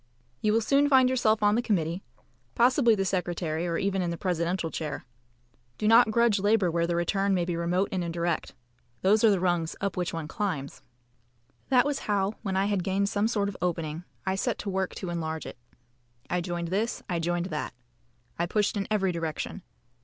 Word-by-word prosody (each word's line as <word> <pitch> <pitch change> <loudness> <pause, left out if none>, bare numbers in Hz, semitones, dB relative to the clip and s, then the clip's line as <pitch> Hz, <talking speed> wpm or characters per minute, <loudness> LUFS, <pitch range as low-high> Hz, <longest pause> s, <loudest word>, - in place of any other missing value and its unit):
You 215 - +2
will 225 - +3
soon 280 +5 +3
find 260 -2 +6
yourself 220 -4 +2
on 205 0 +5
the 235 - +2
committee 175 -6 -1 0.5
possibly 240 -1 +4
the 195 -1 -1
secretary, 175 -3 -1
or 170 -1 -1
even 195 -1 0
in 175 - -1
the 170 - -3
presidential 170 -1 -1
chair. 155 -4 -4 0.7
Do 210 - 0
not 230 +1 +7
grudge 230 -2 +3
labour 205 -3 +3
where 170 0 +1
the 170 - 0
return 195 +3 +1
may 175 -2 +1
be 175 -1 -2
remote 175 +3 0
and 185 -2 -1
indirect. 170 -1 -2 0.5
Those 210 +4 +4
are 225 - +7
the 200 -3 +3
rungs 175 -3 0
up 200 -1 -2
which 180 -1 -1
one 165 -2 -4
climbs. 160 -7 -3 0.9
That 255 -1 +5
was 290 -1 -1
how, 200 0 +1
when 195 -3 -2
I 195 - +2
had 200 -3 0
gained 195 +2 0
some 205 +1 +1
sort 205 -3 0
of 200 - -5
opening, 165 -2 -2 0.2
I 190 - +1
set 190 - -1
to 200 - -4
work 190 0 -2
to 180 - -5
enlarge 160 -2 -3
it. - - -9 0.7
I 180 - +1
joined 170 -1 -3
this. 210 +6 -1
I 175 -3 -1
joined 175 +1 -1
that. 150 -4 -4 0.6
I 170 - +1
pushed 210 +4 +1
in 200 -1 -2
every 195 -3 +1
direction. 165 +3 -4
190 Hz, 200 wpm, -28 LUFS, 170-210 Hz, 0.9 s, not